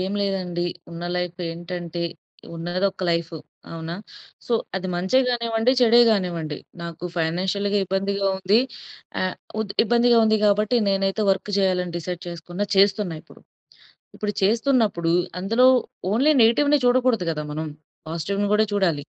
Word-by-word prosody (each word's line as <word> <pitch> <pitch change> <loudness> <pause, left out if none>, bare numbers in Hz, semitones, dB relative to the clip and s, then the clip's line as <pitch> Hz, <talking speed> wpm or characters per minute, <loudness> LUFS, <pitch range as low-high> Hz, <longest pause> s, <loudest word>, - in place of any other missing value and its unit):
ఏం 190 +2 -2
లేదండి. 180 -3 -2 0.2
ఉన్న 170 +1 -7
లైఫ్ 180 0 -3
ఏంటంటే 175 0 -5 0.5
ఉన్నది 175 +4 -1
ఒక్క 190 - -10
లైఫ్. 170 0 -1 0.4
అవునా? 165 0 -5 0.5
సో, - - -2 0.2
అది 190 0 -3
మంచే 185 +9 +2
గానివ్వండి, 235 0 +1
చెడే 235 0 +6
గానివ్వండి. 170 -8 -1 0.2
నాకు 170 0 -7
ఫైనాన్షియల్‌గా 190 +5 0
ఇబ్బందిగా 195 +1 -1
ఉంది. 195 +3 +3 0.6
ఆహ్, 185 0 -1 0.3
ఉత్ 205 -2 -3
ఇబ్బందిగా 240 +1 +4
ఉంది 220 0 +3
కాబట్టి 210 +3 +2
నేనైతే 195 +2 0
వర్క్ 195 +2 -1
చేయాలి 185 -2 +2
అని 175 -1 -8
డిసైడ్ 175 +1 -5
చేసుకున్న, 175 +3 -6
చేస్తున్న 195 -2 +3
ఇప్పుడు. - - -18 0.7
ఇప్పుడు 210 -1 -3
చేస్తున్నప్పుడు 220 -6 +2 0.3
అందులో 225 +7 +3 0.5
ఓన్లీ 275 +8 +4
నెగెటివ్‌ని 285 +6 +4
చూడకూడదు 245 -6 +2
గదా! 150 -1 -3
మనం. 155 +1 -4 0.4
పాజిటివ్‌ని 195 +6 -2
గూడా 215 +1 +4
చూడాలి. 175 -8 +1
195 Hz, 135 wpm, -23 LUFS, 175-220 Hz, 0.7 s, చెడే